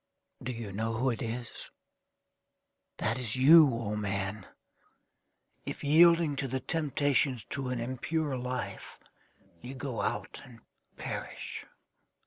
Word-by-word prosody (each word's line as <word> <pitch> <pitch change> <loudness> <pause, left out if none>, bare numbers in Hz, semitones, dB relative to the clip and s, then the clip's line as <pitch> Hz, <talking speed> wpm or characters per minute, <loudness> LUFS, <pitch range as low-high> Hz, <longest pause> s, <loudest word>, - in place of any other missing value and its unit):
Do 125 - -3
you 115 -4 -6
know 110 +3 -2
who 125 +3 +1
it 115 - -5
is? 115 +1 -3 1.5
That 115 +4 0
is 120 -3 -2
you, 145 +3 +8
O 115 -3 -3
man, 100 -1 -3 1.2
if, - - -6
yielding 165 +1 +5
to 135 - -1
the 130 +1 -2
temptations 140 -4 +1
to 135 -2 -1
an 125 -1 -2
impure 135 +4 -2
life, 125 0 -4 0.6
you 130 +2 -7
go 130 -4 -3
out, 110 +3 -3
and 120 -3 -15 0.4
perish. - - -5
125 Hz, 120 wpm, -30 LUFS, 115-140 Hz, 1.5 s, you